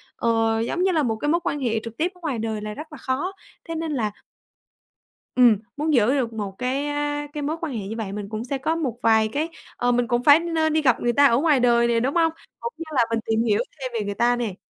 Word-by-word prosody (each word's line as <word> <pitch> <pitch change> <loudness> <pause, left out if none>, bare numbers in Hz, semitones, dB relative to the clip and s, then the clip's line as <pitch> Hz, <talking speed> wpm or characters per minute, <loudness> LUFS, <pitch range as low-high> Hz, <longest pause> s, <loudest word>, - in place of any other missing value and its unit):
ờ, 225 -1 +1
giống 240 +10 -1
như 380 - +3
là 320 -4 +2
một 225 -4 0
cái 295 +7 -2
mối 340 +3 +3
quan 290 - -1
hệ 230 -4 0
trực 230 0 -8
tiếp 345 +3 0
ở - - -19
ngoài 285 -8 -2
đời 220 -1 -3
là 210 0 -5
rất 305 +7 -9
là 305 - -9
khó, 275 +8 -2 0.4
thế 330 - -3
nên 320 -1 -3
là 225 -7 -1 1.2
Ừm, 245 -4 +6 0.2
muốn 305 +1 0
giữ 240 -1 +4
được 250 -5 -1
một 205 -3 -4
cái 260 +3 -1 0.5
cái 295 - -4
mối 305 +3 -2
quan 320 -5 -3
hệ 210 -5 -4
như 220 - -5
vậy 215 -4 -4
mình 205 -1 -5
cũng 215 +1 -4
sẽ 275 +2 -2
có 315 +5 -1
một 270 -8 -2
vài 220 -1 +4
cái 295 +9 -2 0.3
ờ, 245 - +2
mình 245 0 +1
cũng 240 +1 0
phải 285 +3 +8
nên 325 -2 0
đi 315 - +3
gặp 255 -6 +3
người 240 0 +1
ta 285 +4 +5
ở 235 -4 +5
ngoài 295 -1 +3
đời 235 -1 +4
nè, 235 -1 +2
đúng 265 +6 -1
hông? 330 -1 +3 0.3
Cũng 470 - -5
như 330 - -5
là 245 - +4
mình 230 0 0
tìm 225 0 +1
hiểu 220 -1 +2 0.2
thêm 260 -2 -4
về 220 -3 -2
người 205 - -2
ta 240 +3 +3
nè. 230 -6 -3
245 Hz, 270 wpm, -23 LUFS, 225-300 Hz, 1.2 s, phải